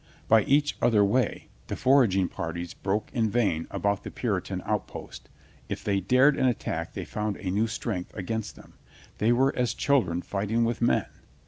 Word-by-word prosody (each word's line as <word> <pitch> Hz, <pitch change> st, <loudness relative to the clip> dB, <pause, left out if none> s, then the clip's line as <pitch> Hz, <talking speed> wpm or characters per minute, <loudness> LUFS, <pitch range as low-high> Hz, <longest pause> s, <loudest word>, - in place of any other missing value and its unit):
By 110 Hz, 0 st, +6 dB
each 145 Hz, +1 st, +2 dB
other 105 Hz, -4 st, +4 dB
way 125 Hz, +6 st, 0 dB, 0.2 s
the -, -, -3 dB
foraging 120 Hz, -9 st, +3 dB
parties 85 Hz, +1 st, -5 dB
broke 105 Hz, +2 st, -2 dB
in 115 Hz, -3 st, +1 dB
vain 100 Hz, -8 st, 0 dB
about 100 Hz, -1 st, -1 dB
the -, -, -7 dB
Puri -, -, -1 dB
tan -, -, -5 dB
outposts. -, -, -5 dB, 0.4 s
If -, -, -4 dB
they 100 Hz, -1 st, +1 dB
dared 130 Hz, +9 st, +4 dB
,an 130 Hz, -, +2 dB
attack 120 Hz, -, -2 dB
they -, -, -5 dB
found 105 Hz, -1 st, -3 dB
a 95 Hz, -3 st, -4 dB
new 105 Hz, +4 st, +1 dB
strength 110 Hz, -5 st, -4 dB
against 110 Hz, +2 st, -4 dB
them. -, -, -16 dB, 0.5 s
They 110 Hz, +2 st, +3 dB
were 130 Hz, +3 st, +3 dB
as 125 Hz, -1 st, 0 dB
chil 140 Hz, -2 st, +3 dB
dren 90 Hz, -2 st, -4 dB
fighting 105 Hz, +4 st, 0 dB
with 115 Hz, 0 st, -2 dB
men. 120 Hz, -, +2 dB
110 Hz, 185 wpm, -27 LUFS, 100-120 Hz, 0.5 s, By